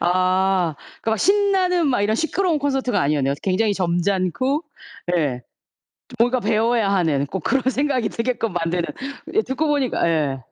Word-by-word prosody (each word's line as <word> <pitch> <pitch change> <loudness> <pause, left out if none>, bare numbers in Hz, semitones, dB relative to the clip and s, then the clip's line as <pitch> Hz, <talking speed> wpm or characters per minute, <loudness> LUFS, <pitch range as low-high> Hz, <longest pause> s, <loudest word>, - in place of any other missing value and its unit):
아. 185 -1 +2 0.3
그 225 - -1
막 220 - 0
신나는 380 - +2
막 245 - +1
이런 215 +2 +1
시끄러운 335 +1 0
콘서트가 270 -6 0
아니었네요. 140 -1 +1
굉장히 200 +2 +1
점잖고 185 - 0 0.5
예. 130 -6 -1 0.7
좀 245 - -12
뭔가 245 +2 +2
배워야 225 -1 +1
하는, 155 -7 +1
꼭 185 +7 -4
그런 270 -1 +1
생각이 265 -4 0
들게끔 230 -3 -2
만드는. 175 0 -1 0.5
예 435 - +3
듣고 285 +4 -2
보니까 280 - +1
예. 150 -5 0
215 Hz, 320 characters per minute, -21 LUFS, 175-270 Hz, 0.7 s, 예